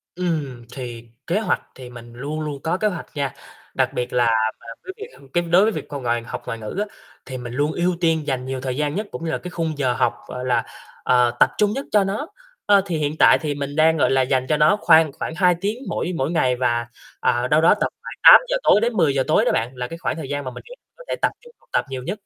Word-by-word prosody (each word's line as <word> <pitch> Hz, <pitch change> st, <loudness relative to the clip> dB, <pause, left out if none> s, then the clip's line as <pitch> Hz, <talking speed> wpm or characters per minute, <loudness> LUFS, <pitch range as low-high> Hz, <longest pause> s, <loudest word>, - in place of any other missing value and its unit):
Ừm, 150 Hz, -9 st, -3 dB
thì 120 Hz, -3 st, -8 dB, 0.2 s
kế 180 Hz, +5 st, +1 dB
hoạch 220 Hz, -, 0 dB
thì 130 Hz, -2 st, -10 dB
mình 120 Hz, -1 st, -12 dB
luôn 145 Hz, +6 st, -5 dB
luôn 145 Hz, -3 st, -5 dB
có 165 Hz, +2 st, 0 dB
kế 215 Hz, +2 st, +1 dB
hoạch 180 Hz, -4 st, -4 dB
nha, 140 Hz, -2 st, -2 dB, 0.4 s
đặc -, -, +1 dB
biệt 125 Hz, -, -3 dB
là 120 Hz, -1 st, +3 dB, 0.3 s
là -, -, -17 dB, 0.2 s
cái 375 Hz, -, -7 dB
việc 430 Hz, -, -12 dB
cái 175 Hz, -, +3 dB
đối 175 Hz, +3 st, +4 dB
với 220 Hz, -, +3 dB
việc -, -, -6 dB
c -, -, -23 dB
ngoại 120 Hz, -4 st, -1 dB
học -, -, -7 dB
ngoại 115 Hz, -, -5 dB
ngữ 105 Hz, -1 st, -7 dB
á, 210 Hz, -, 0 dB, 0.4 s
thì 130 Hz, -1 st, -6 dB
mình 120 Hz, -1 st, -7 dB
luôn 145 Hz, +4 st, 0 dB
ưu 175 Hz, +2 st, 0 dB
tiên 160 Hz, -2 st, +1 dB
dành 130 Hz, -2 st, -2 dB
nhiều 130 Hz, 0 st, -4 dB
thời 130 Hz, -1 st, -3 dB
gian 150 Hz, 0 st, -1 dB
nhất 210 Hz, +2 st, -3 dB
cũng 165 Hz, -, -6 dB
như 160 Hz, -, -1 dB
là -, -, -1 dB
cái 180 Hz, -, -8 dB
khung 165 Hz, -3 st, -3 dB
giờ 130 Hz, -4 st, +1 dB
học, 120 Hz, -, +1 dB
gọi 125 Hz, 0 st, -6 dB
là, 120 Hz, -2 st, +1 dB, 0.4 s
ờ, 125 Hz, -1 st, +3 dB
tập -, -, +6 dB
trung 210 Hz, -1 st, +2 dB
nhất 275 Hz, +3 st, -4 dB
cho 210 Hz, -2 st, +4 dB
nó. 205 Hz, +10 st, -3 dB, 0.4 s
Ơ, 205 Hz, -2 st, +5 dB
thì 175 Hz, -4 st, -2 dB
hiện 150 Hz, 0 st, -2 dB
tại -, -, +7 dB
thì 150 Hz, -2 st, -2 dB
mình 140 Hz, 0 st, -5 dB
đang, 160 Hz, +1 st, +4 dB
gọi 145 Hz, -, +2 dB
là, 135 Hz, 0 st, +3 dB
dành 130 Hz, 0 st, +1 dB
cho 150 Hz, -, +2 dB
nó 150 Hz, +7 st, +4 dB
khoan 160 Hz, -2 st, +5 dB
khoảng 160 Hz, +2 st, -5 dB
2 180 Hz, 0 st, +3 dB
tiếng 205 Hz, +3 st, -1 dB
mỗi -, -, -2 dB
mỗi 135 Hz, +1 st, -1 dB
ngày 130 Hz, -7 st, +2 dB
và, 120 Hz, -2 st, 0 dB, 0.3 s
ờ, 120 Hz, +1 st, +1 dB
đâu 150 Hz, +4 st, +3 dB
đó 165 Hz, -, +6 dB
tầm -, -, +1 dB
khoảng -, -, -8 dB
8:00 -, -, +8 dB
tối 210 Hz, -, +5 dB
đến 235 Hz, +1 st, +1 dB
10:00 145 Hz, -9 st, +2 dB
tối 155 Hz, -, +3 dB
đó -, -, +3 dB
bạn, 115 Hz, +2 st, -1 dB
là 125 Hz, 0 st, -4 dB
cái 165 Hz, -, -8 dB
khoảng 170 Hz, -, -2 dB
thời 155 Hz, -4 st, -7 dB
gian 145 Hz, 0 st, -3 dB
mà 130 Hz, -, -5 dB
mình -, -, -10 dB
nghĩ -, -, -10 dB, 0.2 s
có -, -, -12 dB
thể -, -, 0 dB
tập -, -, +2 dB
trung 480 Hz, -1 st, -17 dB
học -, -, -31 dB
tập -, -, +1 dB
nhiều 130 Hz, -1 st, -5 dB
nhất. 185 Hz, +10 st, -3 dB
150 Hz, 270 wpm, -22 LUFS, 125-175 Hz, 0.4 s, 8:00